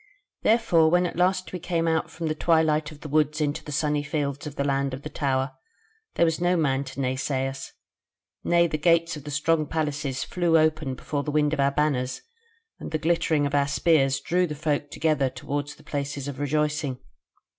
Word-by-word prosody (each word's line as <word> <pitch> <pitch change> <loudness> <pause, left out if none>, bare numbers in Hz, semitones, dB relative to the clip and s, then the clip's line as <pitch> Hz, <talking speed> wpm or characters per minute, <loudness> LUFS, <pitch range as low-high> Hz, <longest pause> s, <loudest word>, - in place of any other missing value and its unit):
"Therefore 215 -8 +4
when 180 +2 +3
at 175 - -3
last 185 +1 +1
we 180 - -3
came 165 -1 -1
out 160 -1 +1
from 165 - -6
the 155 - 0
twilight 155 -2 +2
of 150 0 -13
the - - -7
woods 150 +1 +1
into 145 -1 -1
the 150 - -8
sunny 150 0 0
fields 145 -1 -3
of 145 - -8
the 140 - -1
Land 140 -1 0
of 135 - -11
the 150 - -6
Tower, 135 -1 0 0.6
there 170 - +4
was 165 +1 0
no 175 0 +2
man 140 -4 +1
to 135 - -8
naysay 130 0 -1
us; 135 0 -7 0.7
nay, 170 0 +4
the 155 -2 -2
gates 165 0 +3
of 150 -1 -10
the - - -6
strong 155 +1 +1
places 145 -4 -2
flew 170 -2 +2
open 155 -4 +1
before 145 +2 -3
the 150 - -5
wind 150 0 +2
of 155 - -2
our 140 0 +4
banners, 140 -3 -1 0.6
and - - -6
the 160 - -1
glittering 160 -2 +1
of 140 - -2
our 140 -1 +3
spears 140 -2 +2
drew 180 +1 +1
the 150 - -5
folk 145 -1 -1
together 150 -5 +1
toward 145 +2 -4
the 145 - -11
places 140 -1 -4
of 140 -2 -6
rejoicing. 150 -1 0
150 Hz, 205 wpm, -25 LUFS, 140-160 Hz, 0.7 s, Therefore